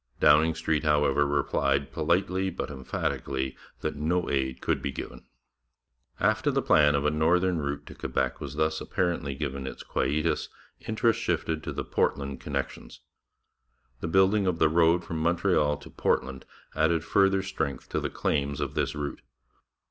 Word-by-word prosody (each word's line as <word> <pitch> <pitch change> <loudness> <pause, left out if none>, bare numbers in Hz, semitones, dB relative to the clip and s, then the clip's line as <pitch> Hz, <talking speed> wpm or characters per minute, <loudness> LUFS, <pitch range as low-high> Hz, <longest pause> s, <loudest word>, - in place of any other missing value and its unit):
Downing 80 +2 +5
Street, 80 -2 0
however, 75 -1 +3
replied 70 -1 0
politely 90 +4 +1
but 85 - -5
emphatically 65 0 -3 0.3
that 75 - -2
no 85 +4 0
aid 65 -2 -1
could - - -1
be 70 - -2
given. 65 -1 -8 0.9
After - - +2
the - - +1
plan 75 -1 +5
of 70 +1 0
a 75 - +3
northern 85 +3 +2
route 70 -1 -3
to - - -10
Quebec - - -2
was - - -6
thus 80 +1 0
apparently 85 -6 -1
given 70 -2 -4
its - - -7
quietus, 75 +4 0 0.4
interest 115 +1 +2
shifted 80 -5 -1
to - - -5
the - - -4
Portland 70 -1 -1
connections. 70 -2 -5 1.0
The 80 - -3
building 95 +3 +3
of 90 -2 +1
the 80 -2 +4
road 85 +2 +3
from 80 -1 -4
Montreal 85 -3 +2
to 75 - -13
Portland 65 0 -1 0.3
added 80 +1 +2
further 95 +1 +3
strength 80 -7 -3
to - - -1
the - - -2
claims 70 0 -1
of - - -2
this - - -1
route. 75 -1 -4
75 Hz, 155 wpm, -27 LUFS, 70-85 Hz, 1.0 s, Downing